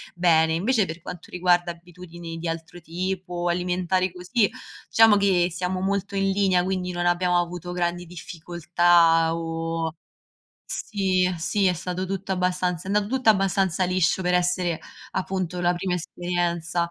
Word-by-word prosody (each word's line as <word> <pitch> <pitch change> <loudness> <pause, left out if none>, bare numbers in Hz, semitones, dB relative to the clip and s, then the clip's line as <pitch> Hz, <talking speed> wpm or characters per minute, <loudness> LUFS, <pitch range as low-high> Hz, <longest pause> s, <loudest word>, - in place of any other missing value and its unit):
bene. 160 -2 +3
Invece 210 +4 +2
per 165 +1 -7
quanto 175 +1 -9
riguarda 175 -1 +2
abitudini 170 -1 -10
di 165 +1 -5
altro 165 +1 -5
tipo, 180 +1 -3
alimentari 180 +1 0
così, 200 +5 +1 0.4
diciamo 225 -2 +6
che 190 -3 +3
siamo 185 +2 -2
molto 200 +1 -1
in 195 0 +1
linea, 190 -2 +2
quindi 185 -1 -2
non 175 0 -2
abbiamo 175 0 +2
avuto 175 0 -4
grandi 175 0 -2
difficoltà 170 -1 +2
o 165 0 -3 0.8
sì, 190 - 0
sì, 200 +5 0
è 180 - +4
stato 180 +1 -4
tutto 195 0 -3
abbastanza 180 -1 -1
è 200 - -1
andato 210 -1 +2
tutto 255 -4 +4
abbastanza 190 -3 +1
liscio 180 0 +1
per 180 0 +1
essere 180 -2 +1 0.3
appunto 185 -2 -2
la 175 - +3
prima 180 +1 -2
esperienza. 175 0 -2
180 Hz, 145 wpm, -24 LUFS, 170-185 Hz, 0.8 s, diciamo